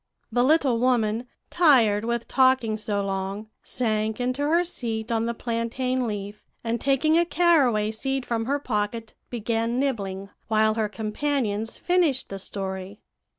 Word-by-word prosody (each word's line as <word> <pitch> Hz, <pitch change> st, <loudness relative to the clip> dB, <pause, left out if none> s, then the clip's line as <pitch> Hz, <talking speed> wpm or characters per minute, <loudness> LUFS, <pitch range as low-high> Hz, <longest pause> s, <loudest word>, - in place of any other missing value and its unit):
"The 245 Hz, +2 st, +2 dB
little 270 Hz, -4 st, +3 dB
woman, 240 Hz, -2 st, +1 dB, 0.2 s
tired 235 Hz, -11 st, +4 dB
with 235 Hz, 0 st, -2 dB
talking 260 Hz, -4 st, +3 dB
so 205 Hz, -2 st, -2 dB
long, 195 Hz, +2 st, -4 dB
sank 220 Hz, -2 st, -1 dB
into 255 Hz, +3 st, -1 dB
her 335 Hz, +3 st, +3 dB
seat 230 Hz, -9 st, -4 dB
on 225 Hz, 0 st, +1 dB
the 235 Hz, -, -2 dB
plantain 245 Hz, +2 st, -1 dB
leaf, 205 Hz, -1 st, -5 dB, 0.2 s
and 230 Hz, 0 st, -2 dB
taking 310 Hz, +4 st, +3 dB
a -, -, +4 dB
caraway 280 Hz, -12 st, +3 dB
seed 270 Hz, +3 st, -2 dB
from 225 Hz, -1 st, -1 dB
her 280 Hz, +4 st, +1 dB
pocket, 225 Hz, -3 st, -3 dB, 0.2 s
began 230 Hz, 0 st, -1 dB
nibbling, 200 Hz, -8 st, -2 dB, 0.2 s
while 220 Hz, 0 st, +3 dB
her 215 Hz, -1 st, -1 dB
companions 220 Hz, 0 st, -2 dB
finished 345 Hz, -7 st, +1 dB
the 195 Hz, -, -6 dB
story. 190 Hz, +1 st, -5 dB
230 Hz, 145 wpm, -25 LUFS, 215-260 Hz, 0.2 s, tired